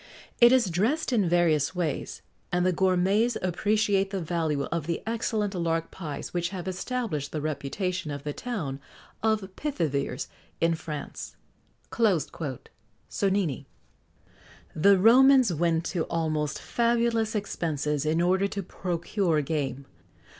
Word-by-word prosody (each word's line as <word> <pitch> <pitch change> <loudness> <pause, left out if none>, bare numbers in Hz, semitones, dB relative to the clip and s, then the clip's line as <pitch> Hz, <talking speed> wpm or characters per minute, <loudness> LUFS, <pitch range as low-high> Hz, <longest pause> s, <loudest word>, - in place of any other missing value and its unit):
It 240 0 +8
is 245 -8 +3
dressed 250 - 0
in 205 -7 +2
various 165 -2 +2
ways; 165 -6 -3 0.3
and 180 0 +1
the 185 - +4
gourmets 190 +6 +2
appreciate 200 +2 +1
the 195 -1 -3
value 160 -4 -1
of 170 -2 -2
the 170 - -2
excellent 220 -2 -1
lark 165 -2 -1
pies 155 -6 -6
which 175 -1 0
have 190 -2 -6
established 185 - -3
the 155 - -2
reputation 155 +4 -3
of 145 -1 -5
the 150 - -3
town 160 - -4 0.4
of 220 -1 +2
Pithiviers 145 - -2 0.3
in 165 0 +3
France." 155 -2 -6 0.6
SONNINI. 180 - -2 1.1
The 195 +5 +5
Romans 250 +1 +6
went 165 +1 +1
to 170 -4 -1
almost 155 -2 -1
fabulous 235 -1 +1
expenses 150 -7 -1
in 155 +2 +1
order 190 +2 +2
to 200 0 -4
procure 175 -2 -1
game. 140 -3 -2
175 Hz, 125 wpm, -27 LUFS, 155-210 Hz, 1.1 s, It